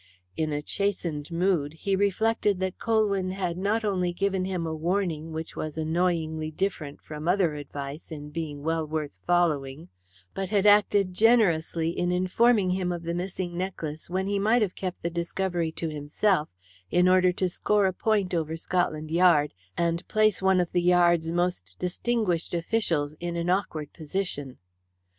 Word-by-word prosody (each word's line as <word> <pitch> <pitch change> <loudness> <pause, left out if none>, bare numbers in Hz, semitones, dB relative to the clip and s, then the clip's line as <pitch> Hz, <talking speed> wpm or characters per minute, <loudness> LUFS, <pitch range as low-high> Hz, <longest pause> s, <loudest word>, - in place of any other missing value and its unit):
In 155 -1 -1
a 145 0 -2
chastened 170 -6 -2
mood, 170 -4 +1
he 195 +4 -1
reflected 205 0 +1
that 190 -1 -3
Colwyn 210 -5 +1
had 185 -2 -2
not 205 +5 0
only 180 -3 0
given 190 +1 0
him 185 -3 -2
a 160 - -2
warning 165 -1 -1
which 160 0 -6
was 155 0 -5
annoyingly 160 -1 0
different 155 -4 -3
from 155 +1 -7
other 180 -3 +3
advice 145 +1 -7
in 150 -1 -7
being 150 -3 -5
well 165 +1 0
worth 150 -10 -4
following, 155 -4 +1 0.4
but 195 -1 -3
had 205 -1 +2
acted 205 -2 +4
generously 175 -7 +3
in 175 +1 -1
informing 185 +2 +3
him 180 -1 -1
of 170 -1 -4
the 170 0 -2
missing 180 0 -4
necklace 170 -4 -4
when 190 +2 -1
he 200 0 0
might 220 +3 +3
have 190 -3 -2
kept 185 -2 -5
the 170 - -1
discovery 170 0 -2
to 165 - -3
himself, 150 +3 0 0.4
in 180 - +3
order 185 0 +5
to 185 +1 0
score 205 +3 +1
a 190 - +1
point 200 -2 0
over 160 -1 -1
Scotland 160 -3 -1
Yard 165 -4 +4 0.2
and 170 0 0
place 215 -3 +2
one 190 -1 +4
of 175 -1 0
the 175 - +2
Yard's 175 -2 +3
most 175 - -1
distinguished 180 -2 -1
officials 165 -5 0
in 175 0 -3
an 170 +1 0
awkward 160 -6 -2
position. 155 -5 -4
175 Hz, 165 wpm, -27 LUFS, 160-190 Hz, 0.4 s, order